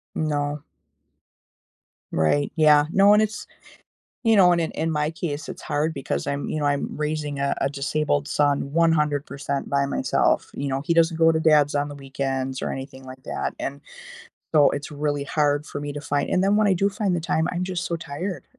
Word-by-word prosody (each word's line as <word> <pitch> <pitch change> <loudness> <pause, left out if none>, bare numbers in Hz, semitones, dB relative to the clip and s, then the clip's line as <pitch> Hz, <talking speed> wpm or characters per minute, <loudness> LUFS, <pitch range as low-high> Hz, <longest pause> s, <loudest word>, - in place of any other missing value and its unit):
No. 145 -1 -1 1.5
Right, 80 - +1
yeah. 150 -2 +5
No, 200 +1 +6
and 210 - +5
it's 210 -1 -2 0.8
you 225 -2 +4
know, 180 -3 +6
and 170 - +2
in 160 - -1
in 165 - -2
my 150 0 0
case, 160 -4 -5
it's - - -8
hard 155 +2 -1
because 70 - -3
I'm, 140 0 -2
you - - -2
know, 145 - 0
I'm 145 -1 0
raising 150 -1 -3
a 140 0 +1
a 135 - +2
disabled 145 +1 -1
son 140 -1 +1
100% 150 -3 0
by 140 0 +1
myself, - - +1
you 140 - -3
know, 135 0 -1
he 170 - +1
doesn't 165 0 +3
go 165 0 +5
to 160 - 0
dad's 150 -2 +4
on 145 0 0
the 145 - -8
weekends 135 -1 -3
or - - -2
anything 135 0 -7
like 130 0 -11
that - - -3
and 140 +1 -5 0.8
so, 145 -2 +6
it's 145 - -4
really 145 -1 -2
hard 145 0 +1
for 145 - -6
me 145 - -4
to 145 - -6
find 145 -1 -1
and 185 - +2
then 200 +1 +3
when 215 0 +3
I 200 - +4
do 195 +3 +1
find 200 -2 -1
the 175 - 0
time, 160 0 0
I'm 180 0 -2
just 180 -2 -3
so 170 - -2
tired. 170 +4 -5
150 Hz, 205 wpm, -24 LUFS, 140-165 Hz, 1.5 s, No